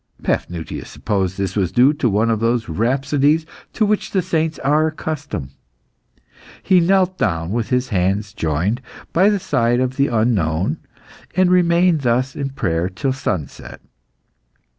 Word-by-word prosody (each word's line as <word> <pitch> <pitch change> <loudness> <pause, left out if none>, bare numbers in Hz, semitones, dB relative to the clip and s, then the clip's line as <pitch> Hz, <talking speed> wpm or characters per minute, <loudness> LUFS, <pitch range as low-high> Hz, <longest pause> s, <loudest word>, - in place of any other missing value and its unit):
Paphnutius 85 -2 -3
supposed 95 -4 -2
this 95 -2 -2
was 95 -4 0
due 125 +8 +4
to 145 -5 0
one 110 +3 +2
of 110 - 0
those 115 0 0
rhapsodies 140 - +1 0.3
to 220 - +1
which 210 0 0
the 190 -2 0
saints 160 -2 -1
are 150 +3 +2
accustomed. 145 - -5 1.1
He 185 -2 +4
knelt 185 +1 +2
down, 85 -4 -1
with 115 -1 -2
his 125 0 0
hands 100 +1 0
joined, 85 - -1 0.3
by 190 +4 +5
the 205 - +2
side 120 -9 +1
of 130 0 -1
the 140 0 +3
unknown, 100 -8 0 0.6
and 185 -1 +3
remained 175 -2 +3
thus 130 +1 0
in 140 -1 -3
prayer 85 -9 -1
till 130 +8 -2
sunset. 95 - -5
125 Hz, 145 wpm, -19 LUFS, 100-155 Hz, 1.1 s, by